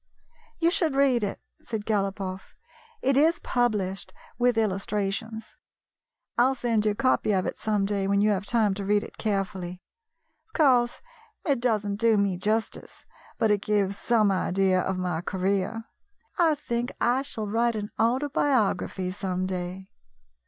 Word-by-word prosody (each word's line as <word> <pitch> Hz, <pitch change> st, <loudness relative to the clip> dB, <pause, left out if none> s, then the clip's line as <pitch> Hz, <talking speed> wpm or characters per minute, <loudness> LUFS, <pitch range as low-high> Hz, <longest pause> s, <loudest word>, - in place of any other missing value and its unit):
"You 335 Hz, 0 st, +2 dB
should 325 Hz, -6 st, +1 dB
read 265 Hz, -4 st, +3 dB
it," 200 Hz, -, -3 dB, 0.2 s
said 220 Hz, -3 st, -5 dB
Galopoff. 195 Hz, -2 st, -2 dB, 0.5 s
"It 270 Hz, 0 st, +3 dB
is 310 Hz, +4 st, +4 dB
published, 210 Hz, -6 st, -1 dB, 0.3 s
with 245 Hz, -1 st, +3 dB
illustrations. 210 Hz, +1 st, -2 dB, 0.8 s
I 240 Hz, -, +6 dB
'll 265 Hz, +1 st, +2 dB
send 230 Hz, -4 st, 0 dB
you 210 Hz, -, +2 dB
a -, -, -11 dB
copy 255 Hz, -3 st, +2 dB
of 185 Hz, -1 st, +1 dB
it -, -, -4 dB
some 210 Hz, -2 st, 0 dB
day 200 Hz, -1 st, -1 dB
when 200 Hz, 0 st, +2 dB
you 210 Hz, +1 st, +3 dB
have 200 Hz, 0 st, -2 dB
time 220 Hz, -4 st, +2 dB
to 200 Hz, +1 st, -5 dB
read 205 Hz, +1 st, +2 dB
it -, -, -12 dB
carefully. 190 Hz, -4 st, -2 dB, 0.7 s
Of 435 Hz, -, -35 dB
course, 250 Hz, -6 st, +3 dB, 0.4 s
it 280 Hz, -5 st, +2 dB
does 225 Hz, -4 st, +1 dB
n't 200 Hz, 0 st, -3 dB
do 230 Hz, -1 st, +4 dB
me 195 Hz, -3 st, +1 dB
justice, 215 Hz, +3 st, -3 dB, 0.3 s
but 225 Hz, -3 st, +2 dB
it 205 Hz, -1 st, +2 dB
gives 200 Hz, -2 st, 0 dB
some 215 Hz, -2 st, +2 dB
idea 185 Hz, 0 st, +2 dB
of 190 Hz, 0 st, -2 dB
my 180 Hz, -3 st, -2 dB
career. 195 Hz, +4 st, -1 dB, 0.5 s
I 330 Hz, -4 st, +3 dB
think 240 Hz, -4 st, -3 dB
I 245 Hz, +3 st, +2 dB
shall 230 Hz, -6 st, -5 dB
write 230 Hz, +2 st, +1 dB
an 210 Hz, -1 st, -4 dB
autobiography 240 Hz, -6 st, +1 dB
some 185 Hz, -1 st, -2 dB
day." 185 Hz, 0 st, -4 dB
210 Hz, 160 wpm, -26 LUFS, 195-240 Hz, 0.8 s, I